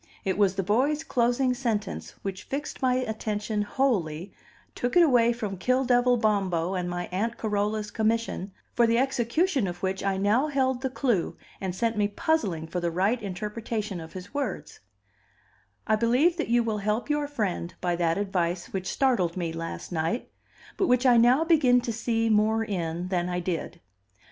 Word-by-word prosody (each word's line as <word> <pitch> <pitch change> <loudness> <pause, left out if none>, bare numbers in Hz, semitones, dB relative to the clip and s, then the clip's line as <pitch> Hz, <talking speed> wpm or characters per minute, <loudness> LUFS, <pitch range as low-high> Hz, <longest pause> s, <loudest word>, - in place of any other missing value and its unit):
It 190 -1 +1
was 195 -2 +2
the 195 - -1
boy's 270 - +1
closing 250 -2 +1
sentence 230 -5 -3
which 195 0 -5
fixed 290 +2 -5
my 255 -1 +3
attention 215 -3 -2
wholly, 195 - -1 0.4
took 245 +8 -1
it 350 - +8
away 240 -6 +4
from 210 -5 -4
Kill 255 +6 +2
devil 245 0 +4
Bombo 195 -5 +1
and 180 -2 -2
my 175 0 -3
Aunt 225 +6 -1
Carola's 210 0 -1
commission, 220 -3 -1 0.2
for 235 -1 +4
the 230 0 +3
execution 265 - +1
of 175 +1 -7
which 190 0 -1
I 195 -1 0
now 210 +9 +2
held 260 -3 0
the 265 - -1
clue, 245 -8 0 0.2
and 185 -2 -3
sent 225 +2 0
me 205 -1 +3
puzzling 205 - -1
for 170 +3 -3
the 170 -1 0
right 195 +8 +1
interpretation 210 +1 -4
of 160 - -10
his 185 +4 -9
words: 285 -1 -4 1.1
"I 220 - +3
believe 250 +10 +3
that 330 - -1
you 240 0 +3
will 220 -2 -1
help 210 +3 -1
your 295 -1 0
friend 205 -10 -2
by 175 -1 0
that 165 0 +1
advice 180 -3 -2
which 190 -1 -3
startled 205 -11 +1
me 170 -2 -2
last 165 +2 -6
night, 165 +8 -2 0.5
but 380 - +2
which 250 +1 +3
I 245 -2 +6
now 245 +6 +5
begin 295 -7 +4
to 235 -1 -3
see 225 0 0
more 220 +1 +3
in 175 -3 -3
than 180 -1 0
I 180 0 -1
did. 175 -2 -4
215 Hz, 180 wpm, -27 LUFS, 185-245 Hz, 1.1 s, it